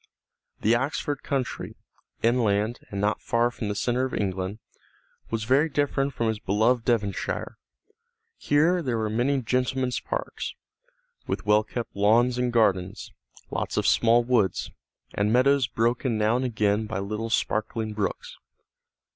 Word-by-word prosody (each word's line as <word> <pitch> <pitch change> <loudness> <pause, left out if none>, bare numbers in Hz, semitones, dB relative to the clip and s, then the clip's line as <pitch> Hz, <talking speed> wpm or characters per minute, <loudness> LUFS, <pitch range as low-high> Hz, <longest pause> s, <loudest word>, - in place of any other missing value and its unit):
The 110 - +3
Oxford 140 +3 -1
country, 135 -3 -3 0.5
inland 115 -1 +2
and 100 - -4
not 105 +1 0
far 120 +1 +1
from 110 -3 -5
the 105 - -2
centre 120 +4 0
of 130 - -2
England, 95 0 -2 0.7
was 115 -1 -2
very 135 +7 +3
different 140 -1 0
from 115 - 0
his 110 -1 -1
beloved 110 +5 +1
Devonshire. 105 -5 -1 0.8
Here 165 +5 +2
there 125 -7 -1
were 110 -1 -1
many 130 +4 +1
gentlemen's 130 +1 0
parks, - - -4 0.7
with - - -3
well 105 +1 +4
kept 115 +2 -6
lawns 120 +5 +3
and 125 -1 +1
gardens, 95 -6 +1 0.4
lots - - -3
of - - +1
small 115 +1 +4
woods, 115 -6 +1 0.4
and 105 +1 +1
meadows 130 +2 +4
broken 115 +1 0
now 110 +2 +2
and 130 +1 0
again 105 -2 0
by 110 - -3
little 105 +3 -3
sparkling 110 0 -1
brooks. 105 -3 -3
115 Hz, 140 wpm, -26 LUFS, 105-125 Hz, 0.8 s, well